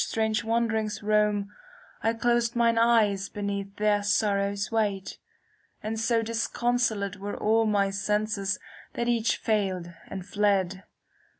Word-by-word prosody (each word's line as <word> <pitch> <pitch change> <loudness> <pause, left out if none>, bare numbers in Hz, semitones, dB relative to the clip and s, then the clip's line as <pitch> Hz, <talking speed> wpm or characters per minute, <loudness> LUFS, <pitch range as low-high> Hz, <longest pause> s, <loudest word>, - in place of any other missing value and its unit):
5° - - -3
CANZONIERE 215 -2 +1 0.6
I 225 - +1
closed 235 0 +1
mine 230 -1 +3
eyes 215 -4 +3
beneath 200 -1 -4
their 210 -1 +2
sorrow's 200 0 0
weight; 205 -4 -1 0.6
And 220 +1 -3
so 225 0 +2
disconsolate 230 -3 0
Were 200 +1 -5
all 225 +1 +2
my 200 -2 +2
senses 200 0 -1 0.4
that 235 - -2
each 230 -2 +1
failed 190 -5 -1
and 190 -2 -6
fled. 195 -2 0
210 Hz, 115 wpm, -27 LUFS, 200-225 Hz, 0.6 s, mine